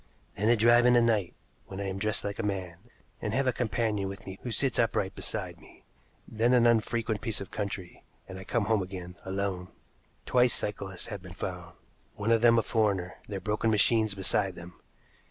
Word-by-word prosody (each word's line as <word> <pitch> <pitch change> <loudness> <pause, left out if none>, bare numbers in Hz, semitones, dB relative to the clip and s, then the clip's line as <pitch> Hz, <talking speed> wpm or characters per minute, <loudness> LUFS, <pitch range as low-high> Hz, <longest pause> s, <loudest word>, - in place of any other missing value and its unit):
Then 105 +3 +1
a 120 - +6
drive 120 +2 +5
in 125 - +6
the 120 - +6
night, 110 -6 +1 0.3
when 95 - -7
I - - -2
am 95 0 -3
dressed 105 +1 -1
like 100 +1 -4
a - - -1
man, 95 -4 -3 0.4
and 105 +1 -2
have 135 +1 +1
a 130 - +2
companion 105 -3 -1
with 95 - -9
me 95 0 -8
who 125 - -5
sits 130 +3 0
upright 100 -5 +1
beside 90 -5 -4
me, - - -18 0.4
then 115 +3 +2
an 120 -1 +5
unfrequented 115 -2 +1
piece 115 -4 -1
of 100 0 -8
country, 100 -4 -5 0.2
and 95 0 -8
I - - -8
come 115 +2 0
home 110 -1 +2
again 90 -1 -7
alone. 95 -1 -2 0.6
Twice 125 -1 +3
cyclists 100 -3 -4
have 100 -4 -6
been 90 -1 -10
found 90 -3 -6 0.4
one 105 +2 -1
of 115 -1 +4
them 115 -1 +6
a 115 - +3
foreigner 100 -6 0
their 100 -2 -4
broken 105 +2 0
machines 110 0 +3
beside 95 0 0
them. 85 0 -12
105 Hz, 200 wpm, -29 LUFS, 95-115 Hz, 0.6 s, a